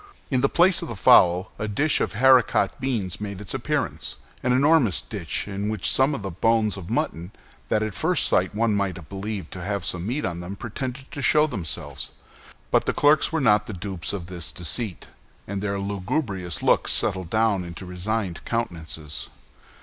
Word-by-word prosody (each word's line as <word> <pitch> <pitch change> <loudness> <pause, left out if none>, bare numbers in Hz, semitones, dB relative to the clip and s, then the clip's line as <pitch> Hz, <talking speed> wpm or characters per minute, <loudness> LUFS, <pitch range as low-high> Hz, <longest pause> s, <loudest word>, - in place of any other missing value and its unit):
In 130 -2 +2
the 140 - +3
place 175 +1 +4
of - - -5
the 115 - -5
fowl 90 -1 +5
a 110 - -2
dish 140 +9 +1
of - - -1
haricot 125 -4 +4
beans 110 -9 -2
made 100 -2 -5
its 105 -3 -6
appearance—an 125 - -2
enormous 130 - +4
dish - - -3
in 100 +1 -3
which 100 -7 -1
some 135 - +4
bones 110 0 +1
of 95 -4 -8
mutton 85 +2 -2 0.4
that 110 - +2
at 110 -2 -3
first 175 - +2
sight 95 +3 +1
one 115 0 +2
might 100 -3 0
have 85 -4 -11
believed 100 -3 -5
to 90 - -7
have 100 -1 -2
some 90 +2 -1
meat 135 +6 -1
on 85 -2 -3
them 90 +3 -6
pretended 125 +5 -6
to 145 - -5
show 150 +4 +4
themselves. 85 - -4 0.6
But - - +3
the - - +2
clerks 150 +3 +3
were 160 - 0
not 105 -4 +4
the 110 - -5
dupes 95 -3 -3
of 95 -4 -5
this 85 -5 -3
deceit, 90 - -2 0.4
and 100 0 -3
their 100 -1 -1
lugubrious 100 - -2
looks - - +3
settled 95 -2 +1
down 110 -3 +2
into 85 +2 -8
resigned 90 0 -3
countenances. 80 - -3
100 Hz, 180 wpm, -24 LUFS, 90-120 Hz, 0.6 s, fowl